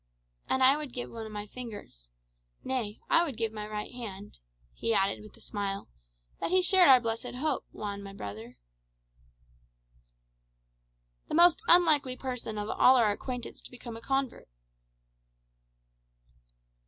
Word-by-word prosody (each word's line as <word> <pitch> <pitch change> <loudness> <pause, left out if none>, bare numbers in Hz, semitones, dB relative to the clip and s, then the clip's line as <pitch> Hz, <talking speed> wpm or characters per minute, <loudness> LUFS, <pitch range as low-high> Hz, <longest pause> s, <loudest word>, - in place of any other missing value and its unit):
And 265 - +2
I 270 +3 +6
would 295 -5 -6
give 245 - -5
one 225 -1 -6
of - - -10
my 210 0 -5
fingers 205 - -10 0.5
nay, 235 -5 -3
I 335 - +5
would 285 -9 -4
give 225 -1 -1
my 210 -1 -5
right 210 0 -5
hand," 205 - -8 0.3
he 225 - -1
added 195 0 +1
with 215 -1 -14
a - - -19
smile, 200 -1 -4 0.5
"that - - -2
he 370 +1 +3
shared 370 -3 +6
our 260 -1 +9
blessed 230 +1 -4
hope, 290 +1 -1
Juan, 200 -1 -5
my 195 0 -8
brother." 110 - -8 2.7
"The - - -3
most 345 0 +6
unlikely 305 -7 +5
person 250 -4 -5
of 205 0 -3
all 255 +3 +5
our 230 -4 +4
acquaintance 245 +3 -6
to - - -9
become 240 -2 -9
a 225 - -9
convert." 270 - -2
230 Hz, 145 wpm, -29 LUFS, 210-265 Hz, 2.7 s, our